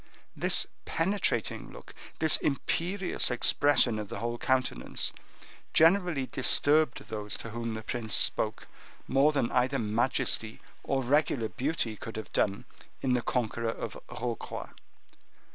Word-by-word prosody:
This - - +3 0.2
penetrating 165 - -1
look, - - -13 0.2
this 160 -1 +4
imperious 180 +6 0
expression 125 -1 +3
of 105 -1 -6
the - - -6
whole 120 +3 -4
countenance, 130 - -1 0.6
generally 165 -4 +3
disturbed 145 +1 +4
those 105 -1 -3
to 115 - -8
whom 115 0 -4
the 110 - -7
prince 110 -3 -1
spoke, - - +3 0.4
more 135 +3 +3
than 135 -6 -1
either 130 +2 +1
majesty 115 0 0 0.2
or 135 -1 -1
regular 130 -4 +1
beauty 125 - -2
could 115 +1 -8
have 110 - -8
done 100 -1 0 0.4
in 130 -2 +1
the 125 - +1
conqueror 115 -1 -2
of - - -5
Rocroi. 120 -2 -5
125 Hz, 125 wpm, -29 LUFS, 115-145 Hz, 0.6 s, this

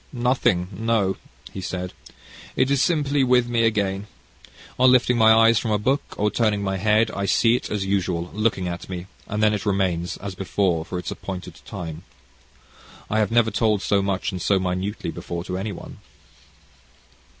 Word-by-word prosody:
"Nothing 120 -8 +1
no," 110 -2 +1 0.4
he 95 - -5
said. 90 0 -4 0.6
"It 135 - +2
is 140 -1 +3
simply 145 -5 +2
with 125 -1 +3
me 115 -1 +2
again. 100 -2 0 0.7
On 130 0 +6
lifting 125 -1 +4
my 110 -1 +6
eyes 115 0 +6
from 115 - -3
a 105 - +2
book, 130 +7 +1 0.2
or 105 +1 +1
turning 105 -2 +1
my 95 -1 -1
head, 110 +3 +2
I 100 0 -3
see 115 +4 +4
it, - - -4
as 105 -2 -2
usual, 90 -3 -1
looking 105 -4 0
at 85 +1 -6
me, 90 -1 -5 0.2
and 105 +1 -1
then 105 0 +4
it 105 - -2
remains, 95 -4 0
as 100 -1 -6
before, 90 -3 0
for 90 - -5
its 90 - -4
appointed 90 -3 -7
time. 85 -5 -6 1.1
I 110 - +2
have 105 - +2
never 115 -1 +3
told 105 -3 +1
so 100 -1 +2
much 95 -1 -1
and 90 -2 -5
so 100 - +2
minutely 95 +3 -2
before 85 -1 -5
to 90 0 -5
any 100 +3 -3
one." 95 - -10
100 Hz, 180 wpm, -23 LUFS, 95-115 Hz, 1.1 s, On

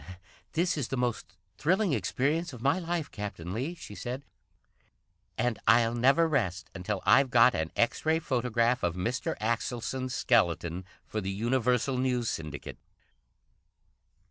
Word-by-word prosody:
"This 175 +1 +1
is 135 -6 -1
the 135 - -3
most 120 -6 -2 0.2
thrilling 185 +2 +2
experience 150 +5 0
of 120 - -9
my 140 +7 +3
life, 170 -3 -3
Captain 95 -4 -6
Lee," 135 - -3
she 135 - -10
said. 120 +8 -5 1.1
"And 125 -2 0
I'll 115 0 +5
never 135 +7 +4
rest 90 - -1
until 95 +1 -3
I've 135 -1 +5
got 120 +1 +6
an 80 0 -2
X 115 - +1
Ray 160 +1 +3
photograph 125 -4 +1
of 85 -1 0
Mr. 115 +7 -2
Axelson's 120 +3 -2
skeleton 85 -5 +1 0.2
for 110 - -3
the 95 - -3
Universal 125 +4 +1
News 125 -3 0
Syndicate." 75 -2 -6
120 Hz, 140 wpm, -29 LUFS, 105-135 Hz, 1.1 s, got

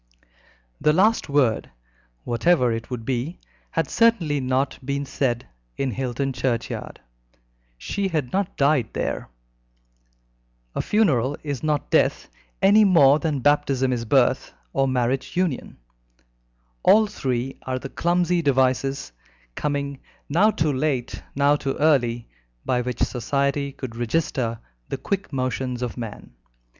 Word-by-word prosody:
The 150 - +4
last 210 +2 +3
word 135 -6 +2 0.5
whatever 125 +1 +2
it 115 0 -4
would 120 -3 -5
be 130 +7 -2 0.3
had 165 - -1
certainly 190 -11 +2
not 130 +1 -1
been 140 +1 -2
said 120 -3 -1 0.3
in 135 -2 -1
Hilton 130 +3 -2
churchyard. 120 -1 -3 0.8
She 200 - -2
had 155 -9 -2
not 195 -1 -1
died 140 -5 +2
there. - - -3 1.4
A - - -1
funeral 145 - +2
is 145 -5 -3
not 150 -3 -1
death, - - +2 0.3
any 210 +3 +7
more 155 -7 +6
than 155 -5 -1
baptism 135 -2 +2
is 120 -2 -2
birth 110 - +2 0.2
or 135 - +2
marriage 130 +3 -1
union. 180 -7 -1 1.0
All 215 - +6
three 130 - -3
are 130 0 -3
the 130 - -6
clumsy 175 +2 +1
devices, 135 - +1 0.4
coming 140 - -2 0.3
now 180 +9 +4
too 155 -8 0
late, 130 -3 -1
now 140 +1 +4
too 140 -2 -3
early, 120 -6 +2 0.4
by 125 -1 +1
which 125 0 -2
Society 140 +3 -1
would 125 -4 -6
register 120 -1 -1 0.3
the - - -2
quick 195 +8 -3
motions 130 -2 -2
of 120 - -4
man. 115 -4 -7
135 Hz, 130 wpm, -23 LUFS, 125-155 Hz, 1.4 s, any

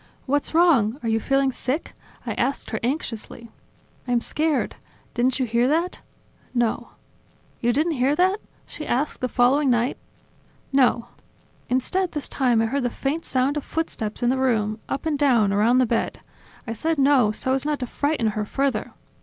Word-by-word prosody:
"What's 290 +3 -1
wrong? 275 -10 +4
Are 230 - -1
you 225 0 +2
feeling 270 +3 +1
sick?" 265 +5 -3 0.3
I - - -2
asked 275 - -2
her 220 - -2
anxiously. 235 -3 -4 0.6
"I'm 245 -1 +2
scared... 300 +4 0 0.4
Didn't 255 +2 +1
you 260 - +2
hear 235 +1 +2
that?". 335 +5 0 0.5
"No." 240 -2 0 0.7
"You 240 - +2
didn't 305 +7 +1
hear 275 0 +1
that?..." 375 +5 +2 0.3
she 305 - -8
asked 275 +5 -1
the 255 - 0
following 265 +4 +3
night. 240 +1 +1 0.7
"No." 245 -3 +3 0.6
Instead 345 +9 0
this 295 -2 -3
time 245 -4 +2
I - - +2
heard 275 +5 -1
the 245 - 0
faint 285 +7 -3
sound 265 +3 +1
of 295 - -3
footsteps 225 -10 -3
in 240 - +3
the 260 - 0
room, 220 -4 +1
up 275 - -3
and 300 -3 0
down, 235 -8 +3
around 220 +5 +3
the 255 - +4
bed; 230 0 -1 0.5
I 230 - -3
said 320 +8 -1
no 270 -6 +4
so 260 +4 -1
as 265 - +1
not 300 0 0
to - - 0
frighten 285 -2 0
her 215 0 -2
further. 275 +6 -1
260 Hz, 175 wpm, -23 LUFS, 235-290 Hz, 0.7 s, wrong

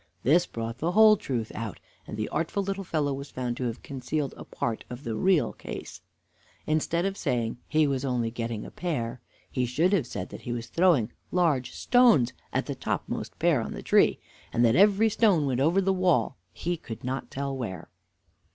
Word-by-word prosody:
This 170 +7 +4
brought 115 +1 -5
the 170 +4 0
whole 215 +1 +8
truth 120 - -3
out, 110 -5 -5 0.3
and 105 - -6
the 110 - -1
artful 170 +6 -1
little 195 0 -3
fellow 150 -5 0
was 140 +1 -6
found 125 -2 -3
to 130 - -2
have 120 0 -4
concealed 140 +1 -3
a - - -9
part 115 -2 -3
of 125 +3 -8
the 115 - -3
real 185 - +2
case. - - -8 0.6
Instead 160 +3 0
of 195 0 -1
saying 120 - -1
"he 155 0 +3
was 135 -2 -1
only 120 -4 0
getting 115 -2 -4
a - - -9
pear," 125 -9 -3 0.3
he 125 - 0
should 165 +10 +2
have 160 -11 +2
said 95 -5 -5
that - - -9
he 120 - -5
was 120 -1 -3
throwing 165 -11 +3 0.2
large 145 -9 +1
stones 230 - +4 0.2
at - - 0
the - - -3
topmost - - -4
pear - - +3
on - - -5
the - - -7
tree, - - +4 0.3
and 120 - +3
that 115 +1 +4
every 205 +3 +5
stone 205 -8 +3
went 130 -2 0
over 165 +7 +3
the 195 0 +2
wall, 180 -7 +2 0.2
he 175 0 -3
could 115 -7 -9
not 130 +2 -3
tell 140 0 -3
where. 115 -8 -6
140 Hz, 195 wpm, -27 LUFS, 120-175 Hz, 0.6 s, whole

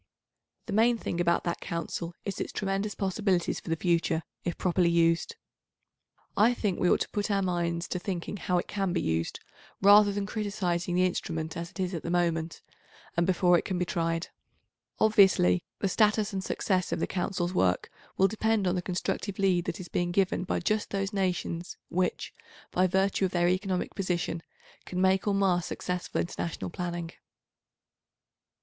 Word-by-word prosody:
The 215 - -5
main 230 +3 +4
thing 175 -5 -2
about 170 0 +2
that 170 - -2
Council 170 0 -4
is 195 -2 -3
its - - -3
tremendous 200 +1 -2
possibilities 190 -2 0
for - - -10
the 165 - +2
future 165 -1 +1 0.2
if 175 - -3
properly 180 -1 +2
used. 165 0 +2 1.0
I 230 +4 +4
think 205 -6 -1
we 180 - +3
ought - - +3
to - - -1
put 205 0 -2
our 200 -1 +1
minds 170 -2 -1
to 180 - -2
thinking 185 +1 -4
how 180 -1 0
it 175 - -1
can 195 -3 -1
be 180 - +1
used, 80 0 -1 0.4
rather 205 +1 +7
than 200 0 -2
criticising 190 -5 -2
the 180 +1 +4
instrument 160 -3 -2
as 170 0 -5
it - - -14
is 185 0 -1
at 165 - -3
the - - -5
moment, 170 -2 0 0.5
and 170 +1 +2
before 180 -1 +4
it - - -5
can 185 - -2
be 180 - 0
tried. 165 0 -1 0.7
Obviously, 190 - +5 0.2
the 200 - 0
status 210 +1 +2
and 190 -1 -2
success 185 -2 0
of - - -1
the - - +1
Council's 180 -1 -2
work 90 - +2 0.3
will 190 - +5
depend 220 0 +1
on 180 - +2
the 180 - -1
constructive 185 +2 -3
lead 185 -3 +2
that - - -3
is 180 - -7
being 175 +1 -1
given 185 0 +1
by - - -1
just 215 +4 0
those 195 +1 -2
nations 180 -3 -2
which, 180 +1 -1 0.4
by 185 +1 +3
virtue 190 +1 +2
of 185 - -2
their 175 -1 +3
economic 185 0 0
position, 175 -3 -2 0.4
can 180 - -4
make 190 +1 +3
or 200 - +2
mar 190 -3 +3
successful 180 +2 -3
international 170 0 -3
planning. 175 -1 -4
180 Hz, 180 wpm, -29 LUFS, 170-195 Hz, 1.0 s, rather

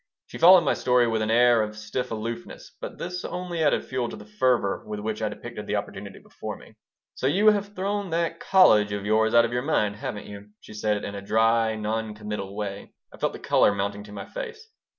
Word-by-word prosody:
She - - -10
followed 180 +1 +9
my 145 - +2
story 125 -1 +3
with 110 -1 0
an 110 - -1
air 120 0 +5
of 105 0 -4
stiff 110 +4 -4
aloofness, 115 +1 -6
but - - -7
this 180 +1 -5
only 175 -2 -3
added 145 - +2
fuel 130 -2 -2
to - - -7
the 105 - -11
fervor 110 -1 +1
with 105 -1 -6
which 110 +1 -4
I 110 - 0
depicted - - -8
the - - -1
opportunity - - -5
before - - -8
me - - -16 0.4
"So 130 - -2
you 200 +9 +5
have 205 0 -3
thrown 200 +1 -2
that 165 0 -1
college 110 - +5
of 100 0 -4
yours 110 +2 +2
out 115 0 +7
of 115 - -4
your 125 - 0
mind, 105 -8 0
haven't 105 -1 -5
you?" 100 0 -10
she - - -13
said 105 -1 -1
in 100 - -5
a 100 - -6
dry, 110 +2 +2
non 110 0 -3
committal 105 -2 -6
way 100 -1 -6 0.2
I - - -12
felt - - 0
the - - -7
color 100 - +3
mounting 100 +1 -3
to 105 - -13
my 105 - -7
face. 460 -3 -8
110 Hz, 225 wpm, -25 LUFS, 105-155 Hz, 0.4 s, followed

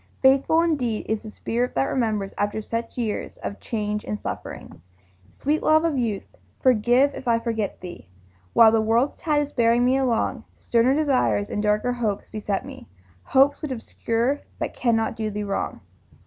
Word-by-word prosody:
Faithful 275 +5 +5
indeed 255 -10 0
is 220 -1 -1
the 220 - -9
spirit 240 +3 -2
that 135 - +3
remembers 215 - -1
After 205 +1 -1
such 230 +2 -4
years 225 -4 -3
of 200 - -5
change 210 -2 -3
and 210 - -4
suffering! - - -7 0.6
Sweet 300 +3 0
love 315 +1 +4
of 325 -3 +1
youth, 230 -6 -1 0.3
forgive 255 +3 +3
if - - -8
I 230 -1 +4
forget 225 -3 -3
thee 175 - -10 0.4
While 225 -1 +7
the 225 0 +3
world's 230 +5 +2
tide 300 -2 +2
is 290 - -8
bearing 235 0 +3
me 255 +2 +3
along; 250 -4 0 0.2
Sterner 240 +3 +2
desires 270 -8 +1
and 210 - -1
darker 210 +3 +1
hopes 220 -5 -3
beset 210 +1 -2
me, 265 -3 -10 0.4
Hopes 275 +2 +3
which 305 - -4
obscure 235 +2 -1 0.2
but - - -3
cannot 225 -2 0
do 220 -1 -2
thee 210 0 -4
wrong. 195 - -3
230 Hz, 170 wpm, -24 LUFS, 215-265 Hz, 0.6 s, While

